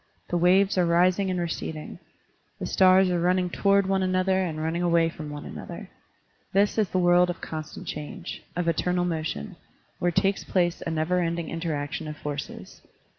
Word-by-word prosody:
The 175 Hz, -, +1 dB
waves 185 Hz, +3 st, +4 dB
are 180 Hz, -, +4 dB
rising 180 Hz, +3 st, +3 dB
and 180 Hz, -1 st, -1 dB
receding. 160 Hz, -2 st, -4 dB, 0.6 s
The -, -, -5 dB
stars 185 Hz, -1 st, +5 dB
are 175 Hz, -, +1 dB
running 180 Hz, +1 st, +1 dB
toward 200 Hz, +1 st, +3 dB
one 190 Hz, 0 st, +1 dB
another 185 Hz, 0 st, +1 dB
and 165 Hz, -4 st, -3 dB
running 160 Hz, +2 st, -1 dB
away 170 Hz, -1 st, +3 dB
from 155 Hz, -2 st, -8 dB
one 145 Hz, 0 st, -7 dB
another. -, -, -8 dB, 0.6 s
This 205 Hz, +3 st, +2 dB
is 210 Hz, -4 st, +2 dB
the -, -, -1 dB
world 175 Hz, 0 st, +4 dB
of 175 Hz, -, -4 dB
constant 155 Hz, -1 st, -7 dB
change, 160 Hz, +5 st, -6 dB
of 175 Hz, -1 st, -1 dB
eternal 180 Hz, +2 st, +1 dB
motion, 155 Hz, -, -3 dB, 0.4 s
where 175 Hz, -, +2 dB
takes 195 Hz, +3 st, +1 dB
place 175 Hz, -2 st, 0 dB
a -, -, -3 dB
never 160 Hz, +3 st, 0 dB
ending 170 Hz, -1 st, -2 dB
interaction 160 Hz, -2 st, -3 dB
of 150 Hz, -1 st, -6 dB
forces. 145 Hz, -1 st, -7 dB
175 Hz, 175 wpm, -26 LUFS, 160-185 Hz, 0.6 s, stars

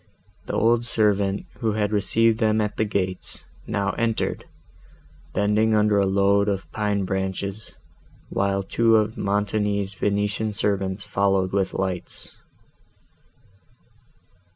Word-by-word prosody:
The -, -, -4 dB
old 115 Hz, +2 st, +3 dB
servant, 100 Hz, -4 st, +1 dB
who 110 Hz, -2 st, 0 dB
had 105 Hz, -1 st, 0 dB
received 110 Hz, +2 st, +2 dB
them 110 Hz, -1 st, +2 dB
at 105 Hz, -1 st, -1 dB
the 110 Hz, -, +2 dB
gates, 95 Hz, -3 st, -3 dB, 0.2 s
now 100 Hz, -2 st, 0 dB
entered, 115 Hz, -1 st, -1 dB, 0.9 s
bending 105 Hz, +2 st, +2 dB
under 105 Hz, -1 st, +3 dB
a 100 Hz, -, +2 dB
load 100 Hz, +1 st, +3 dB
of 95 Hz, -1 st, -3 dB
pine 105 Hz, -2 st, -1 dB
branches, 95 Hz, +2 st, -3 dB, 0.5 s
while 100 Hz, 0 st, 0 dB
two 115 Hz, +3 st, +3 dB
of 110 Hz, 0 st, +2 dB
Montoni's 100 Hz, 0 st, -1 dB
Venetian 105 Hz, +2 st, -1 dB
servants 100 Hz, -2 st, 0 dB
followed 95 Hz, -1 st, +1 dB
with 95 Hz, -1 st, 0 dB
lights. 95 Hz, -2 st, -3 dB
100 Hz, 115 wpm, -24 LUFS, 100-110 Hz, 0.9 s, old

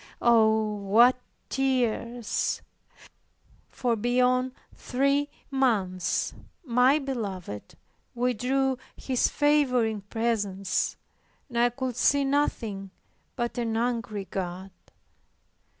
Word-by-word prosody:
Oh, 220 Hz, -2 st, +4 dB
what 220 Hz, +6 st, +5 dB, 0.3 s
tears! 245 Hz, -3 st, -1 dB, 1.1 s
For 245 Hz, -3 st, 0 dB
beyond 250 Hz, +3 st, +2 dB, 0.2 s
three 280 Hz, +3 st, 0 dB, 0.2 s
months 205 Hz, -10 st, 0 dB, 0.3 s
my 250 Hz, +3 st, +4 dB
Beloved 200 Hz, -, -5 dB, 0.4 s
withdrew 250 Hz, +2 st, 0 dB, 0.2 s
His 255 Hz, -2 st, +1 dB
favoring 255 Hz, -8 st, +2 dB
presence, 205 Hz, -2 st, -1 dB, 0.5 s
and 235 Hz, -2 st, -2 dB
I 240 Hz, +1 st, +5 dB
could 255 Hz, 0 st, -4 dB
see 280 Hz, +3 st, +3 dB
nothing 225 Hz, -8 st, -1 dB, 0.5 s
but 240 Hz, -1 st, -2 dB
an 225 Hz, -2 st, -1 dB
angry 230 Hz, -4 st, -2 dB
God. 185 Hz, +1 st, -5 dB
240 Hz, 85 wpm, -27 LUFS, 215-260 Hz, 1.1 s, what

